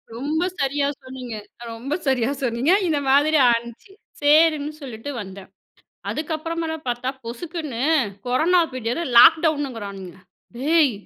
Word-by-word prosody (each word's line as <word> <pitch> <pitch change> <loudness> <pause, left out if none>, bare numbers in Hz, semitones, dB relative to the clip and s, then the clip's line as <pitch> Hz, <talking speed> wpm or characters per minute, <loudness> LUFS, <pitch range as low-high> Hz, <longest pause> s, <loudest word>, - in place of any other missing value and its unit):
ரொம்ப 300 +7 -1 0.2
சரியா 280 +1 0 0.2
சொன்னிங்க. 255 -3 -8 0.4
ரொம்ப 245 +6 -5
சரியா 255 -2 +2
சொன்னிங்க. 245 +7 +1 0.2
இந்த 305 -3 +1
மாதிரி 295 +3 +4
ஆகிருச்சு. 235 - -4 0.3
சேரின்னு 305 0 +4
சொல்லிட்டு 250 0 -7
வந்தேன். 190 -1 -10 0.6
அதுக்கப்புறமாதா 320 +1 -3
பாத்தா 245 +1 -2 0.2
பொசுக்குன்னு, 300 +1 -6 0.5
கொரானா 315 +9 +3
பீரியடு, 250 +6 -3
லாக்டவுனுங்குறானுங்க. 235 - +3 0.4
''டேய், 295 +3 +3
275 Hz, 105 wpm, -22 LUFS, 235-315 Hz, 0.6 s, மாதிரி